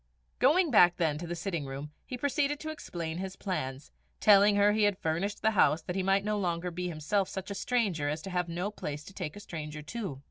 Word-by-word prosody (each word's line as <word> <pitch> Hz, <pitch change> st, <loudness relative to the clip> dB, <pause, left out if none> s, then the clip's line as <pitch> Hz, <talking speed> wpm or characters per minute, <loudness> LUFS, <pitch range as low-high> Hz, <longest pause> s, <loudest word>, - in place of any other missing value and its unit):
Going 315 Hz, +5 st, +4 dB
back 175 Hz, -6 st, +6 dB
then 155 Hz, -4 st, +1 dB
to 170 Hz, -, -6 dB
the 175 Hz, -, -3 dB
sitting 170 Hz, -4 st, -3 dB
room, 140 Hz, +2 st, -6 dB, 0.2 s
he 250 Hz, -, -5 dB
proceeded 285 Hz, +2 st, 0 dB
to 315 Hz, -, -4 dB
explain 170 Hz, -, -5 dB
his 190 Hz, 0 st, -5 dB
plans, 135 Hz, -9 st, -4 dB, 0.3 s
telling 205 Hz, 0 st, +6 dB
her 205 Hz, +1 st, +5 dB
he 215 Hz, +1 st, +1 dB
had 205 Hz, -2 st, +2 dB
furnished 175 Hz, +6 st, -2 dB
the 220 Hz, -, +4 dB
house 175 Hz, -6 st, +3 dB
that 180 Hz, -, -4 dB
he 190 Hz, -, +1 dB
might 195 Hz, +1 st, +2 dB
not 210 Hz, -, 0 dB
any -, -, -1 dB
longer 175 Hz, -1 st, -1 dB
be 180 Hz, +1 st, -3 dB
himself 175 Hz, +4 st, -1 dB
such 190 Hz, +1 st, -5 dB
a -, -, -1 dB
stranger 200 Hz, -9 st, 0 dB
as 155 Hz, +1 st, -3 dB
to 195 Hz, -, -6 dB
have 180 Hz, -1 st, -1 dB
no 180 Hz, +5 st, -2 dB
place 150 Hz, -7 st, -5 dB
to 195 Hz, -, -12 dB
take 180 Hz, -6 st, -5 dB
a -, -, -8 dB
stranger 150 Hz, -5 st, -7 dB
to. 190 Hz, -, -5 dB
185 Hz, 240 wpm, -30 LUFS, 160-205 Hz, 0.3 s, back